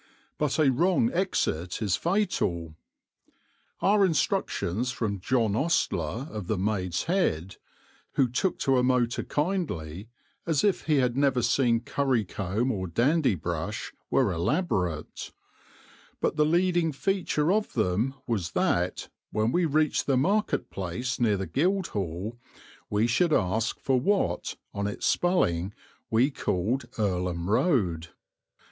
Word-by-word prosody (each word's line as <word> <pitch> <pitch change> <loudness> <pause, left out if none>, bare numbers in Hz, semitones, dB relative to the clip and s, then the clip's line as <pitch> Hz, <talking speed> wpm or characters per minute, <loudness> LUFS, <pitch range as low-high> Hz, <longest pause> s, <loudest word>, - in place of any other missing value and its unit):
But 150 -3 0
a 150 -4 +4
wrong 185 - +2
exit 90 - -1
is 105 -5 +1
fatal. 165 - -1 1.1
Our 205 +1 +4
instructions 125 - 0
from 105 -5 -2
John 115 +1 +1
Ostler 120 - 0
of 105 -5 -6
the 110 - 0
"Maid's 90 -3 -1
Head," 95 - 0 0.6
who 135 - +3
took 145 +10 -1
to 135 -2 +3
a - - +2
motor 125 -2 +1
kindly 115 - -3 0.4
as 155 -4 +2
if 200 -2 +1
he 155 - +2
had 125 -3 +2
never 135 -3 +2
seen 115 -1 +2
curry 130 -6 0
comb 100 +7 -1
or 95 -5 -3
dandy 130 - +2
brush, 80 - -4 0.2
were - - +2
elaborate; 90 - -1 0.9
but - - 0
the 150 0 +3
leading 175 0 +2
feature 170 0 0
of 215 0 -1
them 110 +5 0
was 95 -8 -2
that, 90 +1 0 0.2
when 110 +2 0
we 175 +3 +2
reached 155 -1 +1
the 135 -2 +3
market 200 +11 +1
place 95 +7 -3
near 110 -4 +2
the 95 - -3
Guildhall, 115 - -1 0.5
we 105 +2 +2
should 155 +9 +2
ask 110 +3 0
for 130 -2 +1
what, 200 +9 0 0.2
on 100 0 -2
its 105 - -4
spelling, 100 - +1 0.3
we 120 +6 +3
called 115 +3 -1
"Earlham 90 -4 -1
Road." 95 - +1
120 Hz, 130 wpm, -27 LUFS, 95-155 Hz, 1.1 s, a